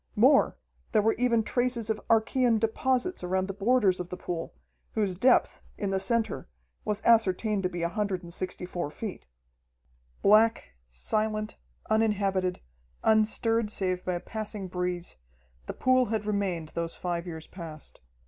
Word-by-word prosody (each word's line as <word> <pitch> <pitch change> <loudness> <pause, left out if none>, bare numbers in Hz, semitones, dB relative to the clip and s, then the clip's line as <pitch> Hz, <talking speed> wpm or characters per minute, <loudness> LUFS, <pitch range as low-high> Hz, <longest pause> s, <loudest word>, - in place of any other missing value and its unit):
More, 265 +6 +5 0.4
there 215 - +5
were 225 - +3
even 235 -2 +3
traces 245 -1 0
of 215 - -3
archaean 230 +1 +3
deposits 255 - 0
around 185 +1 0
the 195 - -4
borders 205 -2 +2
of 180 -1 -5
the 180 - -6
pool, 165 -2 -4 0.4
whose 205 -4 0
depth, 245 +8 +3 0.2
in 200 -1 -2
the 190 - +1
center, 230 +2 0 0.4
was 210 0 -2
ascertained 215 -2 +3
to 185 - 0
be 175 -1 -4
164 180 -2 -2
feet. 195 - -7 1.0
Black, 215 - +4 0.2
silent, 215 - -2 0.3
uninhabited, 200 -4 +1 0.4
unstirred 220 +1 +2
save 185 -3 -2
by 180 - -1
a - - -2
passing 210 -1 -5
breeze, 180 - -3 0.5
the - - -3
pool 255 0 +3
had 215 -1 -2
remained 195 -6 -1
those 170 0 -4
five 175 -1 -3
years 160 -2 -7
past. 160 -4 -10
205 Hz, 140 wpm, -28 LUFS, 180-225 Hz, 1.0 s, More